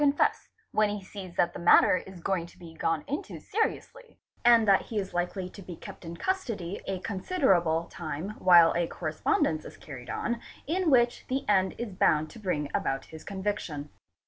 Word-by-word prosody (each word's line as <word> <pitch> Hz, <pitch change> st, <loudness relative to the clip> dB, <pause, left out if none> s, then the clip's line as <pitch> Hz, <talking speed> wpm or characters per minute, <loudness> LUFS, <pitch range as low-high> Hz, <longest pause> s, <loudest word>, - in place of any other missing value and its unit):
CHEATING 290 Hz, -, +6 dB
AND 280 Hz, -, -2 dB
FRAUD -, -, +6 dB
confess, -, -, -19 dB, 0.2 s
when 215 Hz, -1 st, +3 dB
he 205 Hz, -1 st, -4 dB
sees 190 Hz, -2 st, -9 dB
that 175 Hz, 0 st, +2 dB
the -, -, -7 dB
matter 175 Hz, +1 st, +6 dB
is 190 Hz, -1 st, -9 dB
going 180 Hz, -2 st, -1 dB
to -, -, -18 dB
be 165 Hz, -2 st, -11 dB
gone 165 Hz, -1 st, -1 dB
into 290 Hz, +3 st, -5 dB
seriously, 470 Hz, +2 st, -3 dB, 0.3 s
and 235 Hz, -2 st, +6 dB
that 195 Hz, -1 st, +6 dB
he 220 Hz, -, -6 dB
is 195 Hz, -2 st, -2 dB
hkely 180 Hz, +1 st, -3 dB
to 200 Hz, -, -10 dB
be 180 Hz, -2 st, -8 dB
kept -, -, -11 dB
in 170 Hz, 0 st, -7 dB
custody 230 Hz, -, -2 dB
a 195 Hz, -, -1 dB
considerable 185 Hz, -, +1 dB
time 160 Hz, +3 st, -5 dB
while 175 Hz, -2 st, +7 dB
a 170 Hz, 0 st, +1 dB
correspondence 155 Hz, -1 st, 0 dB
is -, -, -11 dB
carried 125 Hz, -5 st, -10 dB
on, 235 Hz, 0 st, -2 dB, 0.3 s
which 290 Hz, -8 st, +3 dB
in -, -, -28 dB
the 275 Hz, -, -7 dB
end 190 Hz, -2 st, +3 dB
is 235 Hz, -4 st, -5 dB
bound 155 Hz, -3 st, +2 dB
to 235 Hz, -, -11 dB
bring 155 Hz, -8 st, -2 dB
about 135 Hz, 0 st, -1 dB
his 160 Hz, -, -9 dB
conviction. 190 Hz, -7 st, -4 dB
185 Hz, 200 wpm, -28 LUFS, 165-220 Hz, 0.3 s, while